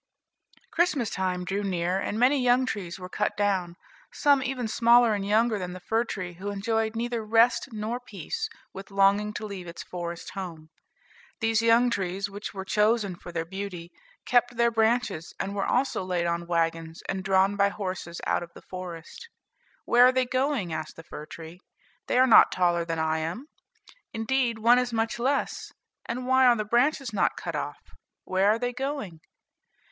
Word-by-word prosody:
Christmas 310 - +1
time 185 -1 -2
drew 195 +2 -2
near, 185 -1 -1
and 205 - -3
many 260 +4 +3
young 250 +1 +3
trees 190 -8 -4
were 180 -1 -8
cut 210 +3 -2
down, 190 -4 0 0.4
some 285 -2 +3
even 255 -2 -2
smaller 235 0 +5
and 200 -1 -2
younger 220 +1 +2
than 180 -1 -5
the 185 - -8
fir 225 +6 0
tree 185 -6 -5
who 190 +4 -6
enjoyed 220 +2 -1
neither 235 0 -2
rest 230 +5 +3
nor 220 +2 -3
peace 255 - -5 0.2
with 195 +1 -9
longing 200 +1 +3
to 215 - -6
leave 195 -4 -7
its 170 - -8
forest 170 -1 -6
home. 165 -5 -7 0.7
These 225 -1 +2
young 230 +2 +4
trees, 195 0 -2
which 205 +2 -6
were 190 -1 -6
chosen 210 -1 +1
for 175 - -11
their 165 -1 -3
beauty, 180 -2 -6 0.3
kept 245 -1 +2
their 235 0 +3
branches, 225 -6 0
and 195 - -3
were 200 -1 -1
also 265 -7 0
laid 180 -2 -1
on 170 0 -2
wagons 165 -1 -1
and 190 -1 -3
drawn 190 +1 +3
by 200 0 +3
horses 185 -4 -5
out - - +1
of 170 - -8
the - - -13
forest. 180 - -9 0.6
"Where 245 +1 +6
are - - +5
they 255 0 +1
going?" 255 - -1
asked 155 -1 -5
the 165 - -11
fir 150 -2 -9
tree. 165 +2 -10 0.5
"They - - +1
are 255 - +6
not 235 - +7
taller 175 -2 +2
than 165 -1 -3
I 160 0 0
am: 170 - -4 0.7
indeed, 235 +1 0
one 235 +3 +5
is 250 -1 -1
much 225 +1 -1
less; 270 +4 -1 0.4
and 250 +2 -3
why 260 0 +5
are 240 - +6
the 215 -2 -2
branches 245 +2 +1
not - - +1
cut - - -5
off? - - -5 0.4
Where 190 +2 +2
are 215 - +3
they 245 +1 -2
going?" 265 - -4
205 Hz, 180 wpm, -27 LUFS, 180-240 Hz, 0.7 s, not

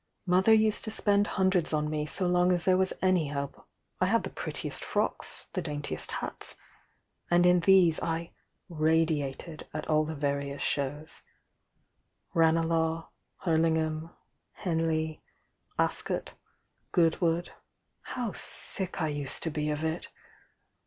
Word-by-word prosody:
Mother 185 +4 +4
used 220 -1 +4
to - - -3
spend 205 -1 +5
hundreds 185 -4 +2
on 150 0 +1
me 150 0 -2
so 185 - +1
long 180 0 +3
as 175 -1 +2
there 185 - +4
was 190 0 +2
any 185 -5 +3
hope— 140 -1 -5 0.3
I - - +2
iiad - - +2
the - - -6
prettisst - - -3
frocks, - - -2
the - - -1
daintiest 145 -1 -3
hats,— - - -3 0.7
and 175 0 +4
in 180 0 +5
these 175 -2 +5
I 165 0 -3 0.4
'radiated' 160 -2 -1
at 155 - -4
all 155 0 +3
the 160 +1 -5
various 140 -1 -2
shows,— 145 +3 -3 1.1
Ranclagh, 165 0 +2 0.3
Hurlingham, 160 -1 +1 0.4
Henley, 160 -2 -1 0.6
Ascot, - - 0 0.6
Goodwood,— 170 0 +1 0.5
how 240 -4 -4
sick 185 -4 +1
I - - +1
used 145 -2 -3
to 165 - -2
be 150 0 -2
of 150 +1 -2
it! 160 +2 -3
165 Hz, 130 wpm, -29 LUFS, 155-180 Hz, 1.1 s, spend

